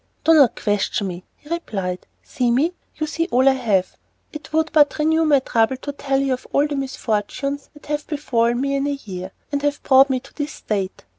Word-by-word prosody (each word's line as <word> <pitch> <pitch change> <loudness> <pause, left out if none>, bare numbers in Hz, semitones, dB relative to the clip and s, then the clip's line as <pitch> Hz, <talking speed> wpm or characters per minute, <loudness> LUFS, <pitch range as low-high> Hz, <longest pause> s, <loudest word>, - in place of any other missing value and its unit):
"Do 325 - +5
not 280 -7 +6
question 205 +1 0
me," 180 -1 -6
he - - -22
replied, 195 - -4 0.2
"see 250 -5 -1
me, 285 +9 +2 0.2
you 310 - -2
see 330 +2 -2
all 255 +2 +3
I - - +8
have. 215 -8 0 0.4
It 305 0 -9
would 315 0 +1
but 295 -2 +4
renew 320 +1 +2
my 295 -2 +5
trouble 230 0 +1
to 285 - -5
tell 275 -1 -1
of 255 0 -3
all 280 - +3
the 295 -1 -3
misfortunes 270 +1 -3
that 295 - -16
have 295 0 -3
befallen 240 -6 0
me 275 0 0
in 275 +1 0
a 285 -1 -1
year, 185 -1 -6 0.2
and 285 -1 -1
have 290 0 -1
brought 270 +1 +6
me 260 -1 +1
to 270 +2 -18
this 295 -1 -4
state." 195 -3 -4
275 Hz, 210 wpm, -21 LUFS, 230-295 Hz, 0.4 s, I